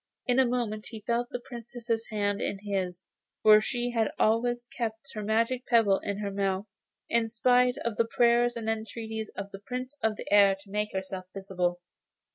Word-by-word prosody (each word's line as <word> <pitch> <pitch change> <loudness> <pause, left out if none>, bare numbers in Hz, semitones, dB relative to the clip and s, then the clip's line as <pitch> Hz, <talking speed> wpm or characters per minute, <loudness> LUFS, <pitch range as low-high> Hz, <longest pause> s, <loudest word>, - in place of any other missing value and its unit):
In 250 +1 +3
a 260 - +5
moment 230 -3 -2
he 220 -2 -8
felt 240 +1 0
the 245 - -4
Princess's 235 -2 -4
hand 205 -1 -1
in 200 - -1
his, 190 -3 -3 0.4
for 215 0 +8
she 245 +2 -2
had 225 -2 +1
always 240 +2 +2
kept 230 +2 -4
her 215 - -4
magic 230 +4 0
pebble 220 -5 +4
in 200 -1 -3
her 205 -1 -3
mouth, 195 0 -1 0.4
in 230 -1 +1
spite 250 +2 +3
of 235 -2 -1
the 230 - +3
prayers 240 +1 +3
and 225 -1 -5
entreaties 220 0 -3
of 200 0 -5
the 195 - -8
Prince 255 +6 -6
of 220 -1 +1
the - - -8
Air 200 -1 +7
to 195 -1 -15
make 210 +1 -1
herself 190 -1 -4
visible. 180 -2 -1
220 Hz, 185 wpm, -29 LUFS, 205-240 Hz, 0.4 s, for